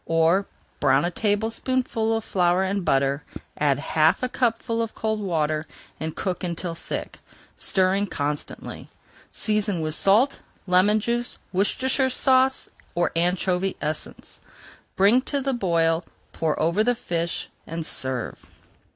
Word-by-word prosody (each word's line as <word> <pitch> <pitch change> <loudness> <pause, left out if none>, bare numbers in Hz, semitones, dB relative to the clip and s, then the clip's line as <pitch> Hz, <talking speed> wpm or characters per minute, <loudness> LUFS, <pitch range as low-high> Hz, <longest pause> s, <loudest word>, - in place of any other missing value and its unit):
Or, 165 +4 +3 0.3
brown - - +3
a 175 - -1
tablespoonful 225 +3 0
of 225 - -4
flour 180 -1 +2
in 195 +1 -1
butter, 140 -3 +1 0.3
add 145 -2 +2
half 155 - +2
a 255 - 0
cupful 230 -2 0
of 225 -1 -4
cold 220 -1 -1
water 155 -5 -1 0.3
and 160 0 -4
cook 185 -2 -3
until 170 0 -3
thick, 165 - -6 0.4
stirring 190 +2 +1
constantly. 145 -3 -4 0.4
Season 210 -4 0
with 155 -1 -1
salt, 215 - +3 0.3
lemon 195 +3 +4
juice, 240 +2 -1
and 185 - -12
Worcestershire 260 +6 +2
Sauce, 260 0 +2 0.3
or 175 0 +1
anchovy 180 +2 +1
essence. 155 +1 -4 0.6
Bring 205 +7 +5
to 280 +2 -2
the 270 0 -1
boil, 170 -6 +1 0.3
pour 160 -2 -1
over 170 +7 +2
the 245 +2 +2
fish, 170 -5 -3 0.2
and 165 0 -4
serve. 130 -5 -3
190 Hz, 135 wpm, -24 LUFS, 165-225 Hz, 0.6 s, Bring